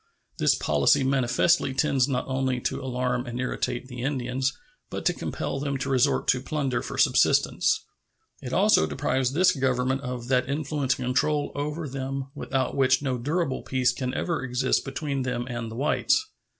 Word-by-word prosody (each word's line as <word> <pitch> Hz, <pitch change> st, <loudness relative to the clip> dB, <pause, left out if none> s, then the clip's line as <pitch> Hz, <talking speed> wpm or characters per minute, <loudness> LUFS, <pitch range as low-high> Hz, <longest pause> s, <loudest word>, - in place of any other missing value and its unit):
This -, -, +4 dB
policy 75 Hz, -, +3 dB
manifestly 130 Hz, +2 st, +2 dB
tends 135 Hz, -1 st, +2 dB
not 130 Hz, -3 st, -1 dB
only 130 Hz, -1 st, 0 dB
to -, -, -2 dB
alarm 125 Hz, -1 st, -1 dB
and 120 Hz, +1 st, -5 dB
irritate 125 Hz, 0 st, -2 dB
the 125 Hz, -2 st, -7 dB
Indians, 130 Hz, -1 st, -1 dB, 0.4 s
but -, -, -5 dB
to -, -, +3 dB
compel 135 Hz, -, -4 dB
them 140 Hz, -1 st, -2 dB
to 135 Hz, +1 st, -3 dB
resort 135 Hz, +2 st, +2 dB
to 125 Hz, -, +3 dB
plunder 135 Hz, -3 st, -1 dB
for -, -, -6 dB
subsistence. -, -, +3 dB, 0.6 s
It -, -, -6 dB
also 80 Hz, -, +4 dB
deprives 130 Hz, -, 0 dB
this 185 Hz, +4 st, +5 dB
Government 130 Hz, -2 st, 0 dB
of 125 Hz, -2 st, -5 dB
that 130 Hz, 0 st, +2 dB
influence 140 Hz, -2 st, 0 dB
and 125 Hz, -, -4 dB
control 145 Hz, +4 st, +1 dB
over 150 Hz, +2 st, -3 dB
them 135 Hz, 0 st, -4 dB
without 135 Hz, -3 st, -2 dB
which 130 Hz, 0 st, +3 dB
no 130 Hz, -3 st, -1 dB
durable 150 Hz, +2 st, -1 dB
peace 130 Hz, -1 st, +1 dB
can 125 Hz, 0 st, -3 dB
ever 170 Hz, -2 st, -1 dB
exist 125 Hz, +1 st, +1 dB
between 135 Hz, 0 st, -3 dB
them 125 Hz, -1 st, -2 dB
and 120 Hz, -2 st, -4 dB
the 110 Hz, -, -8 dB
whites. 145 Hz, -, +2 dB
130 Hz, 170 wpm, -26 LUFS, 125-140 Hz, 0.6 s, this